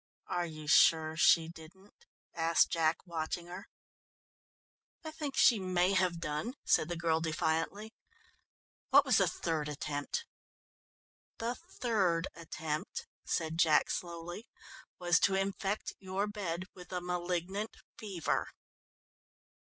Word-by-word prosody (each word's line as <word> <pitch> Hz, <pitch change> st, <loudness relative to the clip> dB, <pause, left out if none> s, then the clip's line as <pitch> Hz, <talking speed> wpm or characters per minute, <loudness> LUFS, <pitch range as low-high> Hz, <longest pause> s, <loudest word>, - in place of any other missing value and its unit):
"Are 175 Hz, -1 st, -1 dB
you 155 Hz, -1 st, -9 dB
sure 155 Hz, +2 st, +5 dB
she 165 Hz, 0 st, +5 dB
didn't?" 170 Hz, +5 st, -15 dB, 0.3 s
asked 165 Hz, 0 st, +3 dB
Jack, 165 Hz, 0 st, +1 dB
watching 170 Hz, 0 st, -3 dB
her. 180 Hz, +2 st, -9 dB, 1.4 s
"I 315 Hz, -, -6 dB
think 295 Hz, -3 st, -5 dB
she 230 Hz, -4 st, +6 dB
may 185 Hz, 0 st, +2 dB
have 185 Hz, -3 st, +2 dB
done," 160 Hz, -, -3 dB
said 155 Hz, -, +3 dB
the 175 Hz, -, -2 dB
girl 165 Hz, -1 st, +1 dB
defiantly; 165 Hz, +7 st, -1 dB, 1.0 s
"what -, -, +7 dB
was -, -, +4 dB
the -, -, +4 dB
third 155 Hz, -3 st, -2 dB
attempt?" 145 Hz, 0 st, -3 dB, 1.1 s
"The 230 Hz, +1 st, -2 dB
third 195 Hz, -10 st, 0 dB
attempt," 160 Hz, -2 st, -5 dB, 0.2 s
said 160 Hz, 0 st, -1 dB
Jack 160 Hz, -2 st, +4 dB
slowly, 175 Hz, +5 st, -5 dB, 0.5 s
"was 175 Hz, -1 st, +3 dB
to 195 Hz, -, +3 dB
infect 195 Hz, +1 st, -2 dB
your 190 Hz, +1 st, -2 dB
bed 190 Hz, -5 st, -3 dB
with 180 Hz, -1 st, -13 dB
a 180 Hz, -, -1 dB
malignant 180 Hz, +3 st, -3 dB, 0.2 s
fever." 195 Hz, -7 st, -2 dB
175 Hz, 120 wpm, -32 LUFS, 160-195 Hz, 1.4 s, what